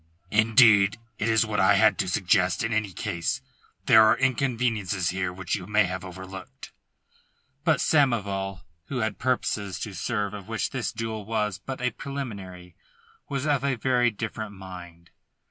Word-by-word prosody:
"Indeed 110 -2 +5 0.2
it 110 - 0
is 115 0 +3
what 105 -1 -2
I 95 +2 +5
had 110 +2 +4
to 95 - 0
suggest 90 +1 +2
in 115 0 -1
any 110 -2 0
case. 85 +6 -2 0.5
There 110 -3 +7
are 110 0 +5
inconveniences 115 -8 0
here 95 0 -2
which 90 -1 -5
you 90 -2 -2
may 105 +1 +4
have 95 -1 -4
overlooked." 95 0 -9 0.9
But 160 -1 +3
Samoval, 100 - +1 0.3
who 130 -3 -2
had 110 0 -2
purposes 105 -6 -1
to 105 - -5
serve 105 0 -2
of 100 -2 -8
which 110 0 -2
this 130 -5 -2
duel 110 -1 -4
was 105 -2 -2
but 135 -2 -7
a 125 0 +1
preliminary, 100 -11 -7 0.5
was 140 0 -2
of 145 -3 +1
a 140 -2 +1
very 125 0 +2
different 110 -1 -5
mind. 90 -3 -11
105 Hz, 160 wpm, -26 LUFS, 95-120 Hz, 0.9 s, There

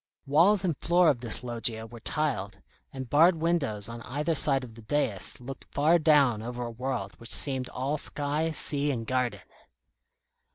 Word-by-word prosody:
Walls 175 +8 +4
and 170 -4 0
floor 175 +3 +3
of 130 -5 0
this 120 0 -3
loggia 115 -2 -1
were 120 +1 -12
tiled, 110 -10 -2 0.3
and 130 -1 -7
barred 165 +7 +5
windows 155 -11 -1
on 115 0 -8
either 145 +7 -2
side 135 -3 +4
the 115 - -13
dais 110 -4 -2
looked 130 +2 -10
far 160 +4 +3
down 145 -8 +3
over 120 +2 -5
a 120 - -6
world 120 -4 -4
which 115 - -9
seemed 130 -3 +1
all 135 +4 -3
sky, 150 +3 -2
sea, 145 -2 0
and 120 -5 -3
garden. 125 0 -1
135 Hz, 165 wpm, -27 LUFS, 115-150 Hz, 0.3 s, barred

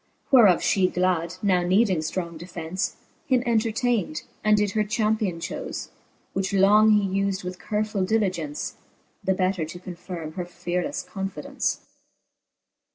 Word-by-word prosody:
Whereof 220 -10 +7
fhe 185 -2 +2
glad, 180 -1 0
now 185 -3 +3
needing 185 +1 +3
ftrong 170 +2 -3
defence, 175 +1 -4 0.3
Him 255 -3 +3
entertayn'd, 230 -6 0 0.2
and 215 0 +5
did 205 -1 +1
her 215 +1 +1
champion 215 -4 0
chofe: - - -5 0.4
Which 195 +1 -1
long 210 +3 +6
he 210 -2 +4
ufd 195 -1 -1
with 180 0 -6
carefull 210 -2 -1
diligence, 185 -9 -1 0.5
The 190 - +2
better 185 -2 0
to 160 +3 -6
confirme 175 -2 -7
her 180 0 -4
fearleffe 180 +8 -3
confidence, 195 -6 -3
XIII. - - -32
190 Hz, 135 wpm, -25 LUFS, 175-210 Hz, 0.5 s, Whereof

